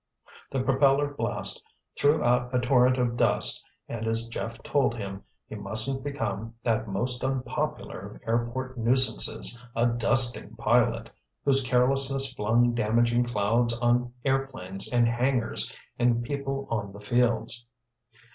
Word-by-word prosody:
The 135 -2 -2
propeller 135 +2 +2
blast - - -3 0.3
threw 145 +2 +2
a 125 +1 +1
torrent 125 +1 +3
of 120 -2 0
dust - - +3 0.2
and 115 -1 -5
as 115 +1 0
Jeff 115 -1 -6
told 135 -4 +1
him, 100 -3 -6 0.3
he - - -10
mustn't 110 +6 +2
become 115 -5 -4
that 110 -1 0
most 120 +6 -2
unpopular 130 -2 -3
of - - -11
airport 120 +3 -2
nuisances, 120 0 +2
a 120 - +2
"dusting 120 +1 +3
pilot," - - +1 0.3
whose 135 -1 +3
carelessness 135 +2 +2
flung 120 +2 +2
damaging 120 +2 +1
clouds 115 +1 0
on 120 0 +1
airplanes 130 -9 -2
in 120 -1 +3
hangars 120 +1 0 0.3
and 120 -1 +2
people 135 +1 -4
on 100 -4 -3
the 100 - -11
fields. 120 +1 -1
120 Hz, 130 wpm, -27 LUFS, 115-130 Hz, 0.3 s, torrent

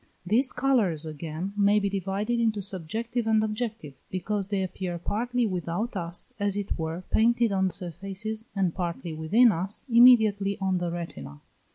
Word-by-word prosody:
These 240 +8 +2
colours 215 - +1
again 160 +4 -5
may 205 0 +4
be 200 -1 +1
divided 200 +4 -1
into 220 -2 +1
subjective 220 +6 -2
and 220 -1 +3
objective, 215 - -3 0.2
because 195 +2 -2
they 200 -2 -1
appear 180 -1 -4
partly 240 +7 -1
without 185 +3 -2
us, 175 +6 -4
as 205 -1 0
it 200 -1 -2
were, 165 +2 -4
painted 235 0 +3
on 190 -1 +2
surfaces, 195 +6 -5
and 190 -4 +1
partly 170 -2 -4
within 205 +10 +4
us, 190 +3 -4
immediately 220 -5 +6
on 190 -2 0
the 175 -1 -2
retina. 170 - -7
195 Hz, 155 wpm, -27 LUFS, 175-220 Hz, 0.2 s, immediately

